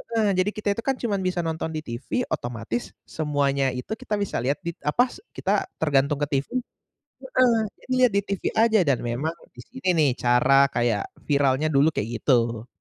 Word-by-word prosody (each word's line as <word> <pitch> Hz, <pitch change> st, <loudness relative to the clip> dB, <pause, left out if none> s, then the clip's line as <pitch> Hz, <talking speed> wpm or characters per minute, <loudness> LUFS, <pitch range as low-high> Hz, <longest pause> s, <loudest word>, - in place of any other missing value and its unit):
heeh, 220 Hz, -2 st, +3 dB
jadi 185 Hz, +2 st, +2 dB
kita 210 Hz, -1 st, -5 dB
itu -, -, -2 dB
kan 270 Hz, -1 st, +1 dB
cuman 205 Hz, -5 st, -1 dB
bisa 185 Hz, -1 st, -1 dB
nonton 160 Hz, 0 st, -2 dB
di 155 Hz, -, -2 dB
TV, 125 Hz, -, -3 dB
otomatis 120 Hz, 0 st, -4 dB
semuanya 140 Hz, -3 st, 0 dB
itu 125 Hz, -, -7 dB
kita 245 Hz, -5 st, -3 dB
bisa 200 Hz, -, -2 dB
lihat 140 Hz, +3 st, +1 dB
dit 170 Hz, 0 st, -5 dB
apa 245 Hz, +12 st, +2 dB
s -, -, -12 dB, 0.2 s
kita -, -, 0 dB
tergantung 145 Hz, -1 st, +2 dB
ke -, -, 0 dB
TV 140 Hz, -, -7 dB, 0.2 s
heeh -, -, -62 dB, 1.0 s
jadi 255 Hz, -, -6 dB
lihat 220 Hz, -, -2 dB
di 200 Hz, -, +3 dB
TV 200 Hz, -2 st, -3 dB
aja 220 Hz, -2 st, +4 dB
dan 135 Hz, -3 st, +3 dB
memang 130 Hz, +8 st, -2 dB, 0.2 s
di -, -, -11 dB
sini 250 Hz, -4 st, -6 dB
nih 145 Hz, -4 st, +4 dB
cara 135 Hz, +3 st, +4 dB
kayak 120 Hz, -4 st, 0 dB, 0.2 s
viralnya 140 Hz, 0 st, +2 dB
dulu 140 Hz, +3 st, +4 dB
kayak 105 Hz, -, -2 dB
gitu. 120 Hz, -3 st, +1 dB
145 Hz, 185 wpm, -24 LUFS, 125-200 Hz, 1.0 s, aja